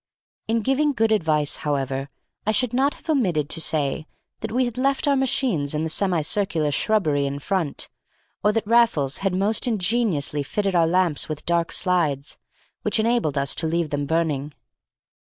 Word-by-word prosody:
In 225 +1 +1
giving 285 +4 +2
good 225 -3 +1
advice, 155 -8 +1
however, 135 -2 -2 0.4
I - - +4
should 245 +2 0
not 270 +3 +2
have - - -20
omitted 180 - +1
to 165 - +2
say 155 0 0 0.3
that - - -5
we 255 +2 +1
had 240 0 -5
left 275 +2 +1
our 280 - +4
machines 235 - 0
in 150 - -1
the 160 - -2
semi 175 -2 +1
circular 165 -4 +1
shrubbery 150 -7 +1
in 140 +1 -4
front, 165 -1 -2 0.6
or 210 - +4
that 225 0 -1
Raffles 210 - +2
had 195 -2 -1
most 205 +6 +1
ingeniously 200 -9 0
fitted 195 +7 -2
our 170 -2 +3
lamps 175 -4 +1
with 155 -1 -5
dark 170 -1 +1
slides, 155 -7 0 0.4
which - - +1
enabled 220 - +1
us 140 0 +2
to 160 - 0
leave 165 -1 -1
them 145 -1 -2
burning. 150 -3 -1
175 Hz, 170 wpm, -23 LUFS, 150-225 Hz, 0.6 s, I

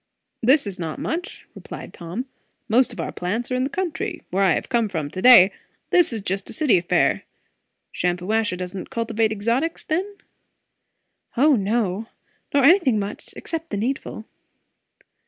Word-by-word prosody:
"This 265 +4 +4
is 195 -3 -6
not 160 -3 -4
much," 340 +2 -4
replied - - -9
Tom. 180 +9 -5 0.4
"Most 240 +3 +3
of - - -10
our - - -3
plants 220 +8 -3
are - - +1
in 255 +1 +1
the - - -2
country 355 0 -3
where 190 +2 0
I 185 -3 +4
have - - -3
come 235 -4 +1
from 155 -6 -4
to 185 - -5
day; 220 -6 +8 0.4
this 350 -6 +4
is 225 -3 -3
just 195 0 -3
a - - -6
city 295 - +3
affair. 170 - +1 0.7
Shampuashuh 180 +3 0
don't 180 +1 -6
cultivate 225 -1 0
exotics, 235 +10 -1
then?" 380 +6 -2 1.2
"O 290 +3 +5
no! 210 -1 -1 0.4
Nor 280 -1 +3
anything 285 - +5
much, 200 0 -5
except 330 -1 -5
the 205 - -3
needful." 225 -1 -3
225 Hz, 155 wpm, -23 LUFS, 190-270 Hz, 1.2 s, day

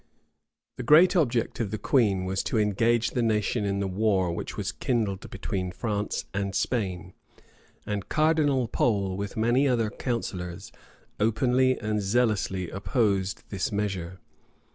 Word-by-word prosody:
} - - -60
The - - -4
great 160 - +6
object 125 -9 +1
of 115 -4 -1
the 110 - -3
queen 100 -7 +2
was 95 +1 -1
to - - -1
engage 115 +3 +2
the 125 - 0
nation 105 -1 0
in 100 0 -1
the 100 - -1
war 95 -2 +1
which - - -6
was 105 -1 -2
kindled 110 -7 -2
between 95 -2 -3
France 105 +1 -3
and 100 -1 -2
Spain; 95 -6 -2 0.7
and 105 -2 -4
Cardinal 155 -5 +2
Pole, 100 -5 0
with 100 +2 -5
many 120 +5 +3
other 115 -4 +1
counsellors, 95 -6 -4 0.5
openly 125 +4 +2
and 105 -1 -1
zealously 100 -4 0
opposed 100 -3 0
this 95 -2 -2
measure. 95 -4 -3
105 Hz, 140 wpm, -27 LUFS, 95-120 Hz, 0.7 s, great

